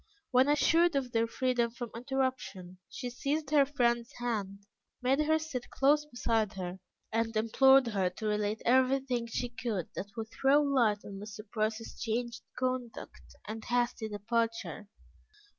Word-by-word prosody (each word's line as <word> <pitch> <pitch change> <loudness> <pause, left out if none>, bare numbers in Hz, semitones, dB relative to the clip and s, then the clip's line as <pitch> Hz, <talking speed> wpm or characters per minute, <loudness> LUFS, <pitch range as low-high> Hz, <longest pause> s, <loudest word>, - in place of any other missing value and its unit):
When 255 +1 +5
assured 330 +3 +4
of 260 -3 -1
their 230 0 +2
freedom 245 0 +1
from 240 0 -7
interruption, 235 -8 -3
she 250 -2 -5
seized 285 +4 -2
her 285 -3 +5
friend's 240 -4 +1
hand, 205 -5 -3 0.3
made 265 +2 +2
her 310 +1 +3
sit 310 -6 -5
close 295 +2 +3
beside 230 -6 0
her, 185 -1 -5 0.3
and 225 0 0
implored 265 +4 +5
her 195 -5 0
to 180 +4 -8
relate 210 0 -1
everything 255 -1 +2
she 245 +1 -2
could 225 -7 -3
that 200 - -4
would 220 -1 -4
throw 275 +2 +4
light 250 -8 +2
on 195 -1 -7
Mr. 215 +1 -9
Price's 215 +1 -3
changed 235 +1 -2 0.2
conduct 255 -2 -4
and 220 +1 -6
hasty 240 -2 0
departure. 225 0 -2
235 Hz, 145 wpm, -31 LUFS, 215-265 Hz, 0.3 s, When